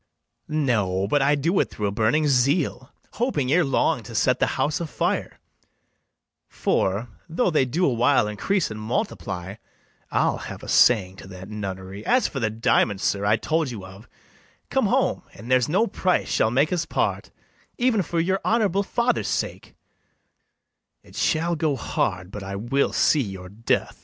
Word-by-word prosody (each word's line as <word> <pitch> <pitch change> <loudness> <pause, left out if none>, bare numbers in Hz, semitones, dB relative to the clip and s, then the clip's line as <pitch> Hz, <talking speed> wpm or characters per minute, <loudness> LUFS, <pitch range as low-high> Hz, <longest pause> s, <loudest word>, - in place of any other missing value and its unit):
No, 110 -11 0
but 145 +7 +2
I 140 +2 +3
do 165 +7 +1
it - - +1
through 105 - -4
a 100 - 0
burning 115 +9 +2
zeal, 140 0 +1 0.3
Hoping 200 - 0
ere 175 +3 +4
long 135 -3 +1
to - - -10
set - - +2
the - - +2
house 145 +3 0
a 170 - -3
fire; - - -2 1.1
For, 100 +5 0 0.2
though 175 +4 +1
they 150 -4 +3
do 165 +9 0
a 135 - +2
while 120 -1 +3
increase 155 - -1
and 110 - -6
multiply, 105 - -3 0.5
I'll - - +1
have - - -8
a - - -8
saying 95 -6 +4
to - - -11
that 95 0 -10
nunnery. 95 -2 -6
[Aside.] - - -3
As 255 - +2
for 135 - -5
the 110 -3 0
diamond, 110 -2 +1
sir, 100 0 0
I 105 +1 +4
told 160 +4 -1
you 105 -6 -7
of, 95 +4 -13 0.6
Come - - +2
home, - - +1
and 115 +5 -9
there's 130 0 +3
no 195 +8 +3
price 185 -3 0
shall 110 - +2
make 140 +8 +2
us 170 -2 -1
part, - - -1 0.5
Even 240 -4 +2
for 170 -1 -2
your 190 +3 +1
honourable 205 -4 +2
father's 235 +4 0
sake, - - -3 1.3
It - - -17
shall 170 +2 +1
go 155 -3 0
hard 90 -6 -2
but 105 - -7
I 95 0 -5
will 120 +7 0
see 150 - +3
your 95 -5 -6
death. 110 +4 -2
130 Hz, 175 wpm, -24 LUFS, 105-165 Hz, 1.3 s, ere